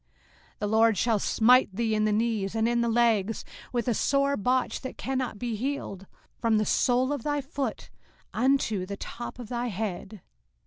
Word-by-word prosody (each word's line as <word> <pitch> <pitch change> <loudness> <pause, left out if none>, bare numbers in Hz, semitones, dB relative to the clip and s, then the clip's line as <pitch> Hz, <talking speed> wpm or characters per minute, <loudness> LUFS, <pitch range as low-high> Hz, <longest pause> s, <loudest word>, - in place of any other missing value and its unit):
05:028:035 - - -40
The 210 - 0
LORD 220 0 +4
shall 225 +2 +2
smite 230 -1 +4
thee 225 0 0
in 215 0 +2
the 215 - +2
knees, 215 -2 0
and 225 0 +2
in 235 0 +1
the 235 - +1
legs, 225 -3 +1 0.3
with 240 -1 -2
a 240 - +3
sore 275 +4 +2
botch 250 +4 0
that 260 - -7
cannot 260 -4 -2
be 235 0 -3
healed, 215 -6 -4 0.3
from 225 -1 +2
the 215 - +1
sole 255 +5 +2
of 285 - -3
thy 290 +3 -1
foot 275 -4 -4 0.4
unto 225 -7 +1
the 200 0 -5
top 240 +4 -7
of 240 -3 -9
thy 245 0 -2
head. 205 -1 -5
230 Hz, 185 wpm, -27 LUFS, 215-255 Hz, 0.4 s, LORD